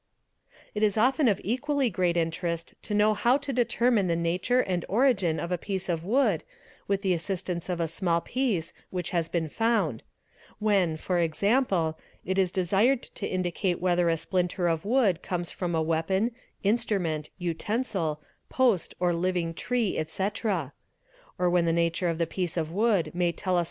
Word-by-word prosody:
It 210 - -3
is 215 -1 +2
often 260 +5 +3
of 205 -4 +2
equally 260 +3 0
great 175 -1 +1
interest 170 0 -2
to 210 - -3
know 210 +1 +4
how 240 +5 +3
to 285 -1 -5
determine 235 -3 +2
the 170 - +1
nature 180 +9 +1
and 180 -6 -1
origin 200 -8 +2
of 170 - -4
a 180 - 0
piece 190 -1 -4
of 165 -2 -1
wood 215 - +2 0.4
with 200 0 0
the 190 -2 +2
assistance 180 0 -3
of 175 -1 -1
a 165 - +1
small 170 +1 0
piece 215 -6 -1 0.2
which 180 -2 -3
has 170 -2 0
been 165 -2 -1
found; 195 - 0 0.6
when, 195 -7 +2
¢.g., 175 - +1 0.3
it 190 +2 0
is 185 -2 +2
desired 205 +8 +2
to 200 - -6
indicate 180 0 -1
whether 175 -1 +2
a 165 - +2
splinter 180 +1 -1
of 165 +1 0
wood 215 -6 +2
comes 175 -2 -3
from 175 -2 -2
a 160 - +1
weapon, 165 +8 +1 0.3
instrument, 195 -8 0
utensil, 175 -2 -2 0.3
post, 240 -10 +2
or 175 -1 +2
'living 170 -1 -1
tree, 240 +3 -1
etc.; 190 - -2 0.6
or 180 - +2
when 175 -1 +3
the 165 - +2
nature 170 +1 +1
of 165 - -1
the 170 - +1
piece 175 +1 -3
of 160 -1 -1
wood 195 -5 +2
may 175 -1 +1
tell 185 +2 -1
us - - +4
180 Hz, 170 wpm, -27 LUFS, 170-215 Hz, 0.6 s, know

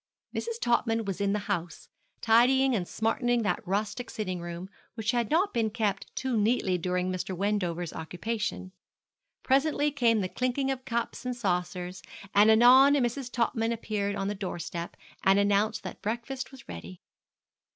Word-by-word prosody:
Mrs. 465 0 -3
Topman 230 - +1
was 195 0 -3
in 200 0 +2
the 210 - +1
house, 170 -3 -3 0.3
tidying 255 +4 +4
and 180 -5 -2
smartening 235 +1 0
that 190 -4 0
rustic 210 +5 -2
sitting 185 -5 -4
room, 175 +1 -6 0.3
which 225 0 0
had 240 -3 0
not 360 +6 +2
been 225 -2 +1
kept 210 -3 -1
too 260 -2 -1
neatly 210 -3 +2
during 180 +1 -1
Mr. 185 0 -4
Wendover's 180 -4 -1
occupation. 190 +3 -4 0.7
Presently 290 +2 +2
came 235 -6 +2
the 185 - -1
clinking 255 +6 -1
of 260 -1 -5
cups 235 -2 -3
and 250 -1 -3
saucers, 180 -3 -2 0.3
and 205 +2 +6
anon 255 +5 +7
Mrs. 250 -1 -1
Topman 230 -1 0
appeared 210 -3 -2
on 195 -1 -2
the 205 - -1
doorstep, 175 -3 -5 0.3
and 195 +1 +5
announced 205 +2 +2
that - - -8
breakfast 235 +4 -4
was 265 -2 -14
ready. 85 +1 -9
220 Hz, 155 wpm, -28 LUFS, 185-245 Hz, 0.7 s, anon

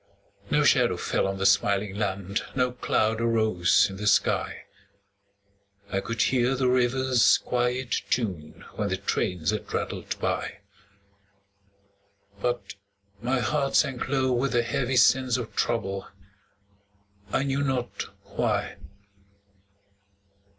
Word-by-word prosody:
No - - +3
shadow - - +3
fell - - 0
on 95 0 -3
the 95 - -2
smiling 100 0 +2
land, 100 -1 -2
No 125 -1 +1
cloud 115 -2 0
arose 110 -6 +3
in 95 - -8
the 105 +1 -3
sky; 105 - +1 1.3
I 95 - +2
could 115 +2 -1
hear 130 0 +2
the 130 -1 +1
river's 125 0 +3
quiet 125 0 -1 0.2
tune 90 -11 -3
When - - -1
the - - -1
trains 90 0 -1
had 105 - -5
rattled - - -3
by; - - -3 1.8
But 120 -5 -2 0.5
my 125 +2 0
heart 140 +1 0
sank 135 -5 +1
low 130 -2 +1
with 130 +2 0
a 120 - +3
heavy 125 +2 -1
sense 130 0 +4
Of 120 -3 -6
trouble, 95 -4 -1 1.2
I 135 - +1
knew 140 0 -1
not 130 -3 -2 0.2
why. - - -2
120 Hz, 120 wpm, -26 LUFS, 105-130 Hz, 1.8 s, sense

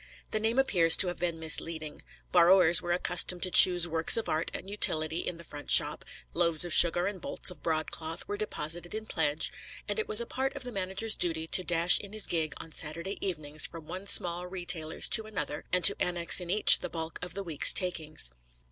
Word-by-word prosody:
The 215 - -2
name 225 +3 -3
appears 175 -11 +4
to 185 - +4
have 175 - -9
been 170 -1 -4
misleading. 160 -1 -2 0.3
Borrowers 175 -1 +3
were 175 - -6
accustomed 180 0 -2
to 185 - -3
choose 175 -1 +7
works 165 +4 +2
of 225 - -5
art 155 +2 -3
and - - -10
utility 160 -5 +1
in 175 - -7
the 170 - -14
front 145 -3 -12
shop; - - +5 0.3
loaves 170 -1 +3
of 175 - -6
sugar 175 +1 +5
and 195 -2 -6
bolts 180 - -5
of 180 - -15
broadcloth 160 0 -5
were 205 - -5
deposited 175 -3 -6
in 220 0 -7
pledge; 155 -5 -2 0.4
and - - -5
it 440 - -4
was 215 - +2
a 235 - -5
part 270 +3 -5
of 280 - -6
the 250 - -7
manager's 195 +2 -3
duty 160 -4 -3
to 185 +3 +1
dash 175 0 +3
in 200 0 -12
his 215 -1 -2
gig 160 -4 -4
on 165 - -13
Saturday 170 +6 -4
evenings 155 -5 0
from 165 -2 -13
one 190 +5 -9
small 175 -1 +2
retailer's 175 -3 -3
to 220 - +5
another, 150 -7 -7
and 180 -1 -1
to 200 - +7
annex 175 0 +1
in 175 - -10
each 210 +4 +6
the - - -8
bulk 160 -1 -8
of 180 -1 -6
the 200 - -6
week's 165 -6 +1
takings. 155 - -2
175 Hz, 210 wpm, -27 LUFS, 160-190 Hz, 0.4 s, choose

